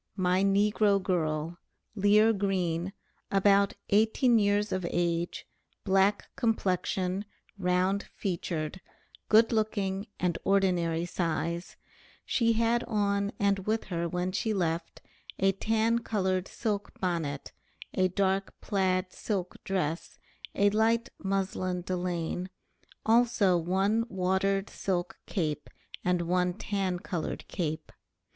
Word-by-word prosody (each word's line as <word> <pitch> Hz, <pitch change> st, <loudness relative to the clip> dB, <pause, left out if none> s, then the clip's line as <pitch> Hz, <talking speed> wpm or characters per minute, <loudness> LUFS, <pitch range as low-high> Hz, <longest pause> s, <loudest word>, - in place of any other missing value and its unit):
my 185 Hz, -1 st, +2 dB
NEGRO 205 Hz, +1 st, +3 dB
GIRL, 170 Hz, -3 st, -1 dB, 0.3 s
Lear 210 Hz, +2 st, +4 dB
Green, 185 Hz, -3 st, -1 dB, 0.4 s
about 200 Hz, 0 st, +4 dB
18 225 Hz, +3 st, +4 dB
years 205 Hz, 0 st, +2 dB
of 185 Hz, -, -1 dB
age, 170 Hz, 0 st, -1 dB, 0.4 s
black 195 Hz, +1 st, +2 dB
complexion, 190 Hz, -4 st, 0 dB, 0.4 s
round 185 Hz, +2 st, +1 dB
featured, 170 Hz, -2 st, -3 dB, 0.5 s
good 225 Hz, +1 st, +6 dB
looking 205 Hz, -2 st, -1 dB
and 175 Hz, -2 st, 0 dB
ordinary 175 Hz, -4 st, +2 dB
size; 170 Hz, 0 st, -2 dB, 0.5 s
she 230 Hz, -2 st, +2 dB
had 230 Hz, +1 st, +2 dB
on 200 Hz, -2 st, 0 dB
and 200 Hz, -1 st, +1 dB
with 220 Hz, +1 st, +1 dB
her 170 Hz, 0 st, -1 dB
when 180 Hz, +2 st, -1 dB
she 215 Hz, +3 st, -1 dB
left, 165 Hz, -2 st, -2 dB, 0.4 s
a 195 Hz, 0 st, +3 dB
tan 225 Hz, +4 st, +1 dB
colored 190 Hz, -5 st, -1 dB
silk 210 Hz, -3 st, -3 dB
bonnet, 165 Hz, -6 st, -2 dB, 0.4 s
a 185 Hz, 0 st, +3 dB
dark 195 Hz, +1 st, -1 dB
plaid 185 Hz, -2 st, 0 dB
silk 190 Hz, -4 st, -4 dB
dress, 175 Hz, -4 st, -2 dB, 0.4 s
a 205 Hz, 0 st, +4 dB
light 225 Hz, +2 st, +2 dB
mouslin 185 Hz, -2 st, -1 dB
delaine, 180 Hz, 0 st, -2 dB, 0.6 s
also 225 Hz, -5 st, +4 dB
one 195 Hz, +6 st, +1 dB
watered 190 Hz, +1 st, 0 dB
silk 180 Hz, -2 st, -3 dB
cape 155 Hz, -6 st, -2 dB, 0.3 s
and 180 Hz, -1 st, +1 dB
one 180 Hz, +1 st, +1 dB
tan 195 Hz, -3 st, -2 dB
colored 175 Hz, -2 st, -4 dB
cape. 155 Hz, -3 st, -3 dB
190 Hz, 110 wpm, -29 LUFS, 180-205 Hz, 0.6 s, good